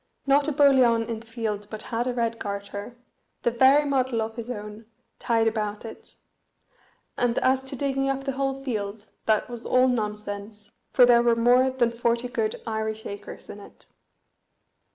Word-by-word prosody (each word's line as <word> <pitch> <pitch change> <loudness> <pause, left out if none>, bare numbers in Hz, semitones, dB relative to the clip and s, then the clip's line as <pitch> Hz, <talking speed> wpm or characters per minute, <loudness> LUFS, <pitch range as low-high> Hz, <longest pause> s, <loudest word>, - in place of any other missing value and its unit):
not 280 +1 +3
a - - +1
boliaun 260 -6 +4
in 230 -2 -4
the 230 - -16
field 220 -3 -4
but 215 -1 -5
had 235 +2 0
a 250 - 0
red 230 -1 -1
garter, 200 +3 -6 0.5
the 240 - +2
very 265 +5 +5
model 260 -4 0
of 220 0 -3
his 235 0 -6
own, 210 -1 -7 0.3
tied 225 -1 +2
about 215 -1 -2
it; 225 - -10 1.0
and 245 -1 +1
as 260 0 +3
to 265 +1 -5
digging 270 0 0
up 270 0 -2
the 270 - -1
whole 270 0 -2
field, 215 -4 -4 0.2
that 215 -1 +2
was 240 -1 -8
all 255 +1 +3
nonsense, 210 -2 -4 0.2
for 250 - +7
there 240 -1 +6
were 235 -1 +3
more 245 +3 +4
than 250 -3 +1
forty 235 +1 0
good 230 -4 -2
Irish 220 -1 -3
acres 200 0 -8
in 205 - -9
it. 200 - -15
235 Hz, 175 wpm, -25 LUFS, 220-260 Hz, 1.0 s, for